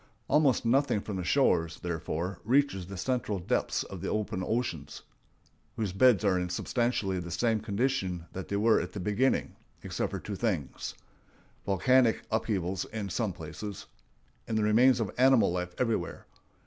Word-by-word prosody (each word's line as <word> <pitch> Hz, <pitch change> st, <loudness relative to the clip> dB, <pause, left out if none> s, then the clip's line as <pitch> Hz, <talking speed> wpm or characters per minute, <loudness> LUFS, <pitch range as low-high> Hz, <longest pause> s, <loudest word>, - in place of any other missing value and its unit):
Almost 140 Hz, -6 st, +3 dB
nothing 130 Hz, -1 st, +3 dB
from 100 Hz, -2 st, -5 dB
the 90 Hz, -, -3 dB
shores, 85 Hz, -, +2 dB
therefore, 85 Hz, +2 st, -3 dB
reaches 120 Hz, -7 st, +2 dB
the 100 Hz, 0 st, -7 dB
central 115 Hz, -1 st, -1 dB
depths 90 Hz, -, -1 dB
of 95 Hz, -3 st, -9 dB
the 95 Hz, -, -3 dB
open 105 Hz, -3 st, -2 dB
oceans, 85 Hz, -, -3 dB, 0.7 s
whose 105 Hz, -5 st, -2 dB
beds 110 Hz, 0 st, +4 dB
are 95 Hz, -2 st, +3 dB
in 90 Hz, 0 st, -2 dB
substantially 100 Hz, 0 st, -1 dB
the 85 Hz, 0 st, -6 dB
same 110 Hz, +6 st, +1 dB
condition 100 Hz, -5 st, -1 dB
that 95 Hz, -, -6 dB
they 100 Hz, -, -2 dB
were 110 Hz, +2 st, +4 dB
in -, -, -1 dB
at -, -, -13 dB
the 105 Hz, -, -5 dB
beginning, 105 Hz, +8 st, +1 dB, 0.3 s
except -, -, -2 dB
for -, -, -4 dB
two 105 Hz, -, -6 dB
things—volcanic 110 Hz, -, -1 dB
upheavals 95 Hz, -5 st, -1 dB
in 105 Hz, -3 st, -5 dB
some 95 Hz, +3 st, -1 dB
places, 95 Hz, +5 st, -7 dB, 0.6 s
and 110 Hz, -, -1 dB
the 110 Hz, -, +2 dB
remains 120 Hz, +5 st, +5 dB
of 110 Hz, -5 st, -1 dB
animal 130 Hz, -6 st, +5 dB
life 90 Hz, 0 st, -3 dB
everywhere. 115 Hz, -3 st, -1 dB
105 Hz, 160 wpm, -29 LUFS, 90-120 Hz, 0.7 s, remains